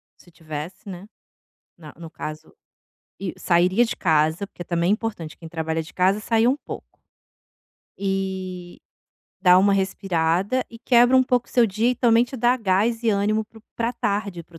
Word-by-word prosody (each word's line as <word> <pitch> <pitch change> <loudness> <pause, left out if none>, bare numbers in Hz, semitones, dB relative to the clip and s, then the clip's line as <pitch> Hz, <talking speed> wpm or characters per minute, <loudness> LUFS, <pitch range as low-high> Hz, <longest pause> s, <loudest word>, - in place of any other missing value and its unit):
se - - -21
tivesse, 155 +3 -8
né, 185 +2 -9 0.7
na 155 -3 -12
no 165 -1 -9
caso, 155 0 -8 0.7
e 190 -3 -4
sairia 180 +6 +3
de 230 - -4
casa, 160 +2 +1
porque 185 - -10
também 170 +1 0
é - - +5
importante 210 -8 -4
quem 165 - -11
trabalha 160 0 -2
de 160 - -13
casa 190 +3 +2
sair 225 +1 +2
um 260 +3 +3
pouco. - - -10 1.0
Eh, 190 -2 -4 0.6
dá 180 -1 +6
uma 200 +1 +4
respirada, 190 +3 0
e 230 - -11
quebra 245 +1 +4
um 260 - +6
pouco 250 -1 0
o - - -18
seu 245 - +4
dia 220 +4 +1
e - - 0
também 235 -1 +4
te 255 +2 -9
dá 245 +1 +3
gás 225 +2 +1
e 230 - +1
ânimo 210 +2 +1
para 220 +1 -17
o - - -22
pra 230 0 -1
tarde, 200 -6 -2
para 170 0 -18
o - - -12
195 Hz, 185 wpm, -23 LUFS, 170-225 Hz, 1.0 s, dá